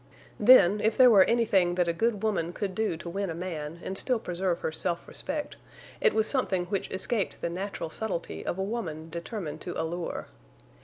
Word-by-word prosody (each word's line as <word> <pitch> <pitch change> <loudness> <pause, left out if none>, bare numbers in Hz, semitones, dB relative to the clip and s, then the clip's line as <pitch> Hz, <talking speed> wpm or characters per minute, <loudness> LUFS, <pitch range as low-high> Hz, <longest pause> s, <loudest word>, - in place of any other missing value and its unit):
Then, 210 -3 +7
if 220 0 +2
there 255 -2 +8
were 195 -4 +7
anything 200 -7 +2
that 180 -1 +1
a 170 - +1
good 220 +2 0
woman 175 -6 0
could 195 -1 -3
do 210 -4 -1
to 170 - -9
win 195 +2 -2
a 165 - -4
man 165 -2 -5
and 190 - -4
still 250 +4 +1
preserve 180 -3 -2
her - - -1
self 170 +2 -2
respect, 295 +1 -4 0.4
it 460 - +4
was 220 - +3
something 195 -10 +1
which 195 +1 -3
escaped 195 +2 -2
the 170 - -3
natural 185 -2 -4
subtlety 200 -5 -3
of - - -3
a 190 - -1
woman 165 -7 -4
determined 170 -1 -5
to 175 - -5
allure. 165 +1 -3
190 Hz, 195 wpm, -28 LUFS, 170-220 Hz, 0.4 s, there